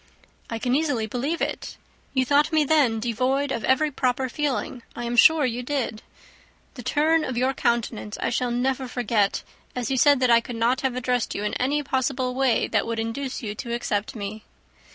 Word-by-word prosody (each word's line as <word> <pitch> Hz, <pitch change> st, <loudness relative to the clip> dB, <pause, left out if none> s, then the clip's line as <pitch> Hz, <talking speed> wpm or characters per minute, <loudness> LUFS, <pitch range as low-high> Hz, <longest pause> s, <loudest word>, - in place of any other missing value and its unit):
"I 230 Hz, -, -3 dB
can 245 Hz, +2 st, -1 dB
easily 280 Hz, -6 st, +1 dB
believe 260 Hz, +9 st, -2 dB
it. -, -, -4 dB, 0.4 s
You 260 Hz, 0 st, +3 dB
thought 290 Hz, +4 st, +3 dB
me 310 Hz, -1 st, +4 dB
then 280 Hz, -7 st, +3 dB
devoid 255 Hz, +5 st, 0 dB
of 230 Hz, -, -2 dB
every 295 Hz, +3 st, +2 dB
proper 260 Hz, -1 st, 0 dB
feeling, 270 Hz, -2 st, -2 dB
I 240 Hz, -, -5 dB
am 235 Hz, 0 st, -2 dB
sure 310 Hz, +4 st, +6 dB
you 245 Hz, 0 st, -2 dB
did. 250 Hz, -4 st, -2 dB, 0.7 s
The 250 Hz, -, -8 dB
turn 310 Hz, +6 st, +2 dB
of 255 Hz, -4 st, -3 dB
your 260 Hz, +2 st, +2 dB
countenance 235 Hz, -4 st, -1 dB
I -, -, -1 dB
shall 250 Hz, +1 st, 0 dB
never 255 Hz, +2 st, -1 dB
forget, 225 Hz, -5 st, 0 dB, 0.3 s
as 250 Hz, -1 st, -2 dB
you 265 Hz, -, +1 dB
said 285 Hz, +2 st, +5 dB
that 250 Hz, -1 st, +4 dB
I 235 Hz, 0 st, +6 dB
could 240 Hz, +1 st, -7 dB
not 235 Hz, +3 st, +1 dB
have 265 Hz, -2 st, -1 dB
addressed 250 Hz, -1 st, -1 dB
you 205 Hz, -, -3 dB
in 210 Hz, -, -2 dB
any 290 Hz, +3 st, +1 dB
possible 260 Hz, -1 st, -1 dB
way 260 Hz, -1 st, +2 dB
that -, -, +1 dB
would 230 Hz, -1 st, -2 dB
induce 250 Hz, +4 st, -4 dB
you 210 Hz, -2 st, -3 dB
to 235 Hz, +2 st, -4 dB
accept 210 Hz, -3 st, -2 dB
me." 210 Hz, 0 st, -6 dB
250 Hz, 195 wpm, -24 LUFS, 230-270 Hz, 0.7 s, sure